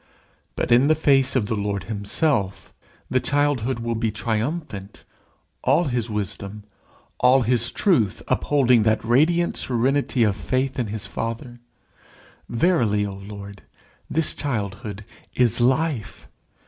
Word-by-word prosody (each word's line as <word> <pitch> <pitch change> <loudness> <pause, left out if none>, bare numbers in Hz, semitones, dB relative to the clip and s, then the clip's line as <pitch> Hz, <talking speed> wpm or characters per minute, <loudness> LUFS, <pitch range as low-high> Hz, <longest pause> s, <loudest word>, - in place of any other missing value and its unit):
But - - -2
in 125 +4 +5
the 155 - +4
face 135 -4 +3
of 125 -5 +2
the 105 - -2
Lord 100 -1 -2
himself, 105 - -1 0.3
the 130 - +1
childhood 140 -3 0
will 115 0 -2
be 115 0 -1
triumphant 110 - -4 0.6
all 140 +7 +3
his 120 -6 -2
wisdom, 105 0 -4 0.6
all 125 +1 +5
his 115 0 +3
truth 125 - +1
upholding 125 -5 +3
that 110 +1 +1
radiant 160 +9 +2
serenity 130 +1 +1
of 105 -3 +2
faith 130 +3 -2
in 120 - -1
his 105 -1 -5
father. 120 +2 -5 0.9
Verily, 115 - +2
O 100 - -5
Lord, 100 0 -10 0.5
this 160 0 +3
childhood 105 -5 -4 0.3
is 120 -1 +2
life. 130 -2 0
120 Hz, 125 wpm, -23 LUFS, 105-135 Hz, 0.9 s, in